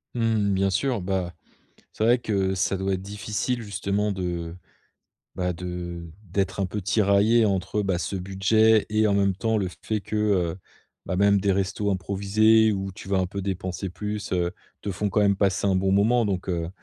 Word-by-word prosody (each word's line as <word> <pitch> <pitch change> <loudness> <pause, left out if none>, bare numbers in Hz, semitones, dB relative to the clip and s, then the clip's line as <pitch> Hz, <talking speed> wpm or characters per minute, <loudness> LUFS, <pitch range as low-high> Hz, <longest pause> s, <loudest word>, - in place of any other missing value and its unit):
Mmh. 110 -4 +1
Bien 95 +1 +2
sûr, 115 +3 0
bah, 90 -2 -2 0.6
c'est 110 - -2
vrai 120 +2 +5
que 95 -4 0
ça 95 +1 0
doit 95 0 -1
être 95 - -4
difficile 105 +4 -3
justement 100 0 -1
de, 85 -3 -4 0.8
bah, 90 0 -1
de 85 -1 -6 0.2
d'être 95 +1 -2
un 95 - +1
peu 105 +1 -5
tiraillé 105 +3 +3
entre, 100 +1 -1
bah, 95 -3 0
ce 85 +4 -3
budget 100 +4 +3
et 110 0 +3
en 100 - +2
même 100 -1 +2
temps 110 +3 0
le 95 -3 0
fait 110 -2 -1
que, 110 - -8
heu, 95 -5 +1 0.5
bah, 90 - -2
même 100 0 +4
des 100 -1 +2
restos 100 +2 -1
improvisés 105 +3 +3
où 95 -1 -3
tu 95 - -11
vas 95 -1 +1
un 95 - +1
peu 100 +1 -5
dépenser 95 0 -3
plus, 105 +2 -5
heu, 90 -1 +1 0.3
te 100 - -3
font 105 +2 -1
quand 105 - +1
même 100 -1 +3
passer 100 0 +1
un 95 - +2
bon 95 +1 +1
moment. 110 +3 +3
Donc, 95 -2 -3
heu, 85 -1 -2
100 Hz, 195 wpm, -25 LUFS, 95-105 Hz, 0.8 s, vrai